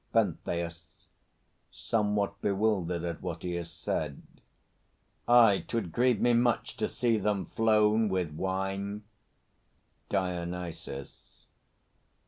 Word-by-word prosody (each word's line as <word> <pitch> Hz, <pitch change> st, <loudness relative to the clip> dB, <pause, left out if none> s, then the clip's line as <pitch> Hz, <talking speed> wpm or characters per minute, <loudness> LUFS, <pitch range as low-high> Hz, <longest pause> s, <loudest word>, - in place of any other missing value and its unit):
PENTHEUS 85 Hz, -1 st, -2 dB, 0.6 s
(somewhat 105 Hz, -2 st, -1 dB
bewildered 95 Hz, -4 st, 0 dB
at 85 Hz, -2 st, -4 dB
what -, -, -5 dB
he 90 Hz, -, -2 dB
has 85 Hz, -1 st, -5 dB
said). 75 Hz, -2 st, -3 dB, 1.0 s
Aye; 115 Hz, -5 st, +6 dB
'twould 110 Hz, -8 st, -2 dB
grieve 125 Hz, +5 st, +2 dB
me 120 Hz, -, +3 dB
much 120 Hz, -1 st, +1 dB
To -, -, 0 dB
see 115 Hz, -3 st, +1 dB
them 105 Hz, -1 st, 0 dB
flown 110 Hz, -1 st, +3 dB
with 90 Hz, -4 st, -1 dB
wine. 95 Hz, +4 st, -2 dB, 1.1 s
DIONYSUS. 90 Hz, -6 st, -4 dB
100 Hz, 100 wpm, -30 LUFS, 85-110 Hz, 1.1 s, Aye